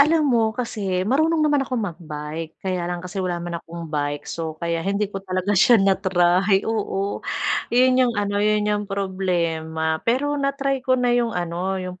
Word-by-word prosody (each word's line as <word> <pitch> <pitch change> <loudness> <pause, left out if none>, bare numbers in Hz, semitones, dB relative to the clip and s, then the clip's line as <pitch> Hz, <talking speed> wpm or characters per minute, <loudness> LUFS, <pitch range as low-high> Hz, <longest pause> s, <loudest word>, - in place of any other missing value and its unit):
Alam 310 +2 +5
mo 225 -2 +3
kasi, 195 -7 -2
marunong 310 +7 +2
naman 295 -2 +3
akong 260 -1 -2
mag-bike 160 -5 -5
kaya 180 -2 -1
lang 175 0 -4
kasi 190 +2 -4
wala 180 -1 -1
naman 170 0 -5
akong 170 0 -8
bike. 145 0 -2
So, 160 -2 -5
kaya 170 0 -2
hindi 200 +3 -1
ko 195 - -4
talaga 185 +1 -1
siya 215 +5 +6
na-try. 195 0 +3
Oo, 205 -3 -2 0.5
yun 255 +1 +4
yung 235 - -2
ano, 205 0 0
yun 210 0 +2
yung 210 0 0
problema. 170 -5 -1
Pero 290 +4 +1
na-try 275 -1 0
ko 255 0 +2
na 245 -1 +2
yung 235 -3 +1
ano, 175 +2 -2
yung 185 -1 -6
195 Hz, 175 wpm, -22 LUFS, 175-235 Hz, 0.5 s, siya